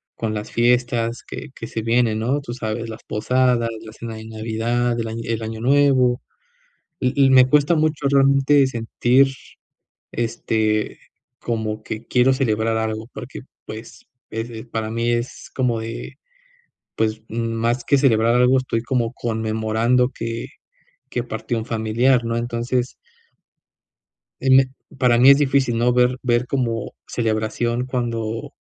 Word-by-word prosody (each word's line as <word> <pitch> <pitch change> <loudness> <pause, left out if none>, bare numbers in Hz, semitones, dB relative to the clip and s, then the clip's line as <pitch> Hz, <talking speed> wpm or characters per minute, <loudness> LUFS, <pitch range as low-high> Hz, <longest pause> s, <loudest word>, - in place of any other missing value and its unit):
con 110 -1 -3
las 105 0 -5
fiestas 120 -1 +1
que - - -7
que 115 - -8
se 115 - -4
vienen, 115 -1 +2
¿no?, 130 +6 0
tú 120 -3 -7
sabes, 115 -1 -4
las 110 - -9
posadas, 125 +3 +1 0.2
la 110 - -10
cena 115 -1 -7
de 110 - -9
Navidad, 115 +2 -1
el 115 - -2
año 115 +1 -5
el 115 -1 -2
Año 110 0 -5
Nuevo, 130 -1 +3 0.8
y 135 +2 +2
y 135 - +4
me 130 -1 +7
cuesta 150 +4 +4
mucho, 155 -2 0
realmente 140 0 +4
sentir, 120 +3 +2 0.8
este, 110 -2 -1 0.4
como 110 -2 -3
que 110 +1 -6
quiero 130 +1 +4
celebrar 110 -3 0
algo, 110 0 -3
porque, 120 +4 -8 0.3
pues, 115 - -10 0.3
eh 115 0 -3
eh, 110 +1 -8
para 110 -2 -4
mí, 115 +1 -1
es 120 +1 -3
como 125 -3 +1
de, 115 +1 -7 0.8
pues, 110 0 -1
más 115 +1 -1
que 140 - +4
celebrar 115 -4 +3
algo, 125 +2 +4
estoy 130 -3 -1
como 120 -1 -1
conmemorando 110 +2 0
que 115 -1 -5 0.6
que 120 - -2
partió 120 0 -4
un 110 - -2
familiar, 115 +3 +1
¿no? 115 0 -1
Entonces 120 +1 -2 1.5
eh, 135 - +1
me 130 0 +6 0.3
para 125 -2 +4
mí 130 +3 +8
es 140 - +7
difícil, 135 -4 +2
¿no?, 120 +1 +3
ver 125 +1 +2
ver 120 -1 +1
como, 120 -5 -2
celebración 120 +2 -1
cuando 115 -3 -3
120 Hz, 145 wpm, -21 LUFS, 110-125 Hz, 1.5 s, mí